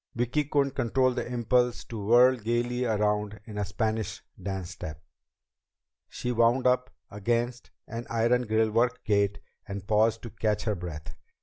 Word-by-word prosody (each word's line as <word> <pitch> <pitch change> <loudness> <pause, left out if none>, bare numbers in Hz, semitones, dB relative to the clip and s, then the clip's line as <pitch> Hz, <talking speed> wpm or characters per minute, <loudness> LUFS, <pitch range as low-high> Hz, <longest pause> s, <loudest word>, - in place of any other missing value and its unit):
Vicki 120 +5 0
couldn't 140 -1 +1
control 130 +1 +2
the 120 - -4
impulse 125 0 +1
to 110 -3 -7
whirl 120 +4 +6
gaily 120 +2 -1
around 105 -1 0
in 105 -2 -6
a - - +1
Spanish 110 +2 -2 0.2
dance 95 -2 -4
step. 75 -2 -7 1.1
She 125 - -3
wound 120 +2 +3
up 125 0 +3 0.2
against 120 +4 -1 0.2
an 115 +2 -6
iron 120 +1 +2
grillwork 110 +2 +2
gate 100 -1 +2 0.3
and 100 -1 -6
paused 110 +2 +2
to 115 - -7
catch 105 -1 -1
her 110 - 0
breath. 80 -5 -7
115 Hz, 145 wpm, -28 LUFS, 105-120 Hz, 1.1 s, whirl